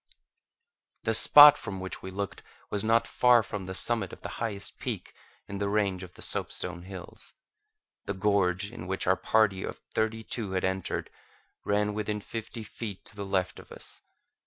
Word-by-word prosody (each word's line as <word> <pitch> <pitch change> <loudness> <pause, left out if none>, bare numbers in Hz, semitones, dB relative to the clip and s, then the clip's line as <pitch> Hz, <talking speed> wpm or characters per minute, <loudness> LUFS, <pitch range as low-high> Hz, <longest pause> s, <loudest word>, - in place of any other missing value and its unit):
The - - +1
spot 145 0 +9
from 100 -3 -6
which 95 0 -6
we 95 - -7
looked 100 +1 -5 0.3
was 100 - -1
not 115 +1 +3
far 120 -1 +4
from 95 -2 -6
the 95 - -5
summit 110 -4 +2
of - - -11
the - - -4
highest 105 -4 -2
peak - - -5 0.3
in 100 0 -6
the 100 0 -1
range 100 -3 0
of 90 -1 -10
the - - -9
soapstone 85 - -3
hills. 90 -1 -10 0.7
The 100 - -3
gorge 95 0 +1
in 90 - -8
which 95 +1 -2
our 95 - +4
party 100 -2 +2
of - - -5 0.2
thirty 110 0 -1
two 105 -4 -3
had 95 - 0
entered 95 -1 -2 0.5
ran 105 0 +1
within 105 0 -2
fifty 115 +2 -7
feet 105 -2 -7
to - - -14
the 100 -1 -5
left 95 -2 -1
of - - -15
us. - - -8
100 Hz, 180 wpm, -28 LUFS, 95-110 Hz, 0.7 s, spot